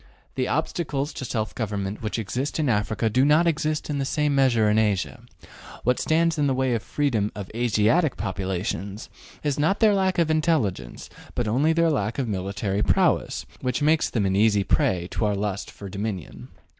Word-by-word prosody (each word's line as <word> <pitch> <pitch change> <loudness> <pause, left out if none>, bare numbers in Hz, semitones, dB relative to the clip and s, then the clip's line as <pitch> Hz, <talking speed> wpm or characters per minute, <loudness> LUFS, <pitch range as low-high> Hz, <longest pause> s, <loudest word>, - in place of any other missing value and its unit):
The 130 -1 -1
obstacles 150 -2 -2
to 130 - -6
self 110 -3 -2
government 105 -3 -3
which 110 0 -3
exist 125 +6 -3
in 150 -4 +1
Africa 110 0 0
do 125 +4 +2
not 150 +4 +4
exist 155 -2 0
in 145 -2 -2
the - - 0
same 150 +1 0
measure 125 -6 +3
in 105 +1 +3
Asia. 105 -4 0 0.6
What 125 +1 +2
stands 165 0 +1
in 145 - +3
the 135 - +1
way 130 -1 +1
of 115 - 0
freedom 115 -7 -1
of 100 -3 -7
Asiatic 120 +7 +2
populations 95 0 -3 0.3
is 145 -2 -1
not 160 +7 +2
their 220 -2 +5
lack 190 -2 +1
of 165 -2 +2
intelligence, 145 - 0 0.3
but 120 -3 -1
only 135 +9 +2
their 165 0 +3
lack 110 -6 -1
of 135 -3 -1
military 100 0 -2
prowess, - - +1 0.2
which 125 +3 -1
makes 155 +1 +3
them 105 -5 0
an 95 0 +1
easy 105 -1 +3
prey 90 -2 +1
to 110 - -1
our 105 -1 +1
lust 100 0 -3
for 100 - -10
dominion. 100 -3 -5
115 Hz, 185 wpm, -24 LUFS, 105-150 Hz, 0.6 s, their